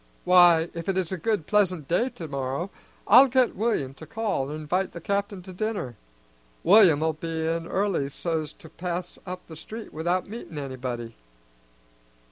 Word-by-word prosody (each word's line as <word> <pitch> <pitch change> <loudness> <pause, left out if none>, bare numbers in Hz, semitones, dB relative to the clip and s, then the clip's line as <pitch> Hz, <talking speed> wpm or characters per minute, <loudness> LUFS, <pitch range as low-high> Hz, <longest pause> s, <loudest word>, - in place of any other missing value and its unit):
"Why, 175 -2 +6
if 170 +2 -5
it 190 - 0
is 185 -2 -1
a 190 - -2
good 210 -3 0
pleasant 185 -7 +1
day 230 +9 +1
tomorrow, 145 - -4 0.4
I'll 265 +3 +8
get 255 -1 +2
William 200 - -1
to - - -12
call 215 -12 -2
an' 150 - -4
invite 175 +5 -2
the 170 - -7
capt'in 200 +1 -2
to 185 0 -10
dinner. 195 - -3 0.7
William'll 165 -5 +6
be 160 +1 -4
in 165 +1 -1
early 190 -8 0
so's 155 0 -3
to - - -15
pass 175 +2 -5
up 180 0 -6
the 160 - -11
street 220 +8 -9
without 175 +4 -1
meetin' 200 -7 -8
anybody." 125 -4 -5
175 Hz, 160 wpm, -26 LUFS, 155-200 Hz, 0.7 s, I'll